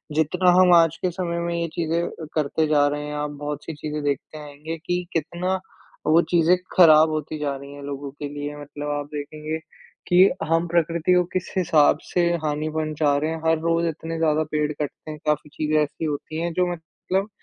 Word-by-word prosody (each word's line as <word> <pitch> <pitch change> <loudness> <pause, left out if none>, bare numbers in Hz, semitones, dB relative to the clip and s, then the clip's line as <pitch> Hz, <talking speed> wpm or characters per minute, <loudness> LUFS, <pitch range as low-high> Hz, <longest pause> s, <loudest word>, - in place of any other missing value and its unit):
जितना 180 +4 +3
हम 180 -1 +6
आज 165 -1 +4
के 185 - 0
समय 170 -1 -3
में 170 0 -2
ये 170 0 -1
चीज़ें 165 0 0
अ, 160 - -6
करते 155 +1 +1
जा 145 -1 +4
रहे 145 0 -2
हैं, 150 - -5
आप 150 0 -2
बहुत-सी 150 +2 -5
चीज़ें 150 0 -5
देखते 145 +2 -2
आएँगे 150 +2 -7
कि 180 0 -1
कितना 175 +4 -1 0.5
वो 160 +2 +5
चीज़ें 175 +1 +4 0.2
खराब 160 -3 +7
होती 155 0 -3
जा 140 -2 -1
रही 140 +1 -10
हैं 145 - -10
लोगों 140 0 -5
के 145 +1 -6
लिए, 145 0 -5
मतलब 145 0 -6
आप 145 -1 -2
देखेंगे 150 +2 -4 0.5
कि 175 - +3 0.3
हम 165 +2 +2
प्रकृति 170 +1 +1
को 180 0 +4
किस 185 -1 -3
हिसाब 155 -5 +4
से 180 - 0 0.2
हानि 150 +1 -1
पहुँचा 155 -2 0
रहे 155 +2 0
हैं, 165 - -3
हर 160 0 +4
रोज़ 165 +1 +1
इतने 165 +1 -4
ज़्यादा 155 -1 +2
पेड़ 150 0 0
कटते 150 +1 -6
हैं, 150 - -7
काफ़ी 150 0 0
चीज़ें 155 0 0
ऐसी 155 +2 -5
होती 155 +2 -3
हैं 170 0 -1
जो 180 +1 +1
मतलब 185 +4 -3
155 Hz, 200 wpm, -23 LUFS, 150-170 Hz, 0.5 s, खराब